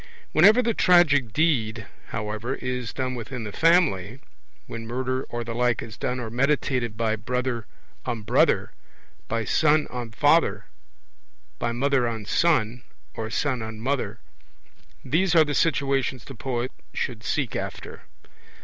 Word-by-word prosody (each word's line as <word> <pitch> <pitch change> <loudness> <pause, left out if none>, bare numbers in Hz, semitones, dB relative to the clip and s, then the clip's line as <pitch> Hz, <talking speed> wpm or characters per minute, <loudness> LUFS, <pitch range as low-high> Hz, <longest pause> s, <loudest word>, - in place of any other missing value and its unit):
Whenever 215 +10 +6
the 230 -1 +1
tragic 150 - +4
deed, 115 -7 +1 0.2
however, 110 +4 -3
is 125 -2 -4
done 130 -1 -3
within 125 0 -5
the 105 - -5
family 135 - +2 0.5
when 115 -1 -7
murder 130 +2 -2
or 120 0 -3
the 115 0 -5
like 120 0 +1
is 115 - -9
done 125 +1 -2
or 115 -3 -5
meditated 125 -3 0
by 110 -2 +1
brother 125 +1 -2 0.4
on 120 -4 -4
brother, - - +2 0.6
by 115 -1 -1
son 155 +3 +3
on 120 -2 -5
father, 115 -5 +2 0.9
by 120 - -1
mother 130 +1 +1
on 110 -2 -4
son, 120 -3 +2 0.3
or 110 -1 -4
son 130 +3 -1
on 110 -1 -6
mother 120 -3 -2 0.9
these 175 +7 +2
are 160 -1 +7
the 145 - -2
situations 135 -6 +1
the 135 - -10
poet 125 0 -3 0.2
should 115 -4 -3
seek 130 +1 -2
after. - - -6
125 Hz, 140 wpm, -25 LUFS, 115-140 Hz, 0.9 s, are